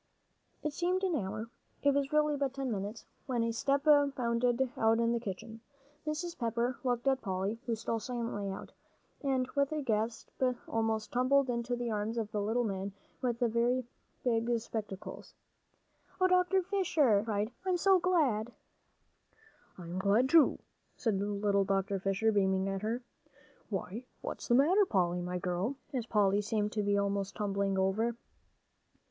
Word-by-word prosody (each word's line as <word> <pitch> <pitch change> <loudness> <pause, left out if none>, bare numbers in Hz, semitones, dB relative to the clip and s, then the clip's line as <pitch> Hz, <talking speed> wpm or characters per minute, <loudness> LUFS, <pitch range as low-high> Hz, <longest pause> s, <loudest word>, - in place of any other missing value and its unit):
It 300 - -2
seemed 360 +4 0
an 365 -4 +1
hour. 215 -1 -3 0.3
It 285 0 +5
was 280 0 0
really 300 -1 +3
but 275 -2 -1
ten 270 -2 -2
minutes, 205 +2 -4 0.2
when 245 -3 0
a 230 - 0
step 275 +4 +1
bounded 255 -4 +3
out 225 0 +3
in 230 0 +2
the 235 - 0
kitchen. 220 +1 -7 0.5
Mrs. 335 +3 -2
Pepper 235 +1 -1
looked 245 -1 0
at 265 -1 +3
Polly, 195 +2 -2
who 230 - +1
stole 225 +1 -2
silently 230 -4 -3
out, 195 - -7 0.5
and 265 -3 +1
with 280 0 +1
a 305 -1 -2
gasp 225 -1 -1 0.4
almost 225 -1 -1
tumbled 255 +1 +3
into 240 +1 -1
the 240 -1 -3
arms 215 +2 -2
of 220 -2 -3
a 210 - 0
little 225 +4 +1
man 195 -2 -3 0.3
with 245 -2 0
very 240 +2 +2 0.4
big 230 -1 +1
spectacles. 215 -4 -6 0.8
"Oh, 370 - +4
Dr. 365 +1 +3
Fisher!" 325 - +3
she - - -8
cried, 215 0 -1
"I'm 370 -1 +1
so 380 +1 +5
glad!" 285 -12 +2 1.3
"And 180 - -9
I'm 185 - -2
glad, 210 +7 +3
too," 325 -1 +6 0.4
said 210 -6 0
little 200 0 +1
Dr. 195 0 0
Fisher, 195 +3 +1
beaming 190 -2 +2
at 195 0 -2
her. 230 +4 -2 0.7
"Why, 210 +4 -4 0.2
what's - - -5
the 240 - +4
matter, 340 +11 +5
Polly, 180 - +1
my 180 +1 -3
girl?" 180 +8 -1 0.2
as 245 -3 -2
Polly 205 -2 +3
seemed 210 0 -1
to 215 - -1
be 205 0 +2
almost 200 0 -1
tumbling 200 -2 0
over. 210 +5 +1
230 Hz, 160 wpm, -32 LUFS, 205-265 Hz, 1.3 s, too